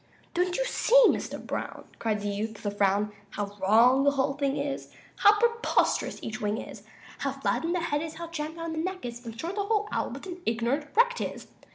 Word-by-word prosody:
"Don't 360 +1 +1
you - - +1
see, - - +4
Mr. - - -2
Brown," - - -5 0.2
Cried 215 -2 0
the 205 - -2
youth, 210 +2 -2
with 215 - -14
a 205 - 0
frown, 205 +1 +2 0.2
"How 205 -1 -3
wrong 235 +7 +5
the 285 - +6
whole 275 0 +1
thing 280 0 -1
is, 280 -1 -3 0.3
How 415 0 +6
preposterous 465 +1 +1
each 220 -1 -5
wing 210 0 0
is - - -8 0.4
How - - -1
flattened 335 +2 -1
the 350 - 0
head 295 -3 0
is, 320 -1 -5
how 335 - -5
jammed 315 -1 -4
down 330 -1 -4
the 320 - -3
neck 370 -1 -3
is 240 0 -6
In 230 -1 -8
short, 335 +9 -4
the 405 0 -1
whole 420 -1 +1
owl, - - -1
what - - -8
an 360 -1 -7
ignorant 240 +5 0
wreck 485 +2 +5
'tis! - - -5
285 Hz, 220 wpm, -28 LUFS, 225-355 Hz, 0.4 s, the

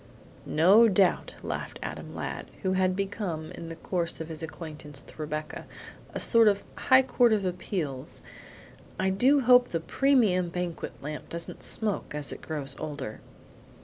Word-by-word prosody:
"No 195 +9 +6
doubt," 195 -2 +2
laughed - - -4
Adam - - -6
Ladd, - - -5 0.2
who 190 - +1
had 185 -1 +2
become, 190 -5 -3
in 165 - -8
the 165 - -6
course 170 0 -2
of 160 0 -6
his 160 -1 -6
acquaintance 155 -3 -8
with - - -16
Rebecca, 155 0 -5 0.4
a - - -4
sort 230 -2 +5
of 200 -1 +3
high 260 0 +5
court 245 -2 +3
of 205 -3 +1
appeals; 175 -7 -4 0.8
"I 190 - +2
hope 250 +4 +5
the 165 - -2
premium 205 -3 +2
banquet 180 -1 -4
lamp 150 +1 -6
doesn't 170 0 -5
smoke 210 -8 0
as 150 -1 -2
it - - -10
grows 140 -4 -4
older?" 145 -8 -5
180 Hz, 150 wpm, -28 LUFS, 155-205 Hz, 0.8 s, No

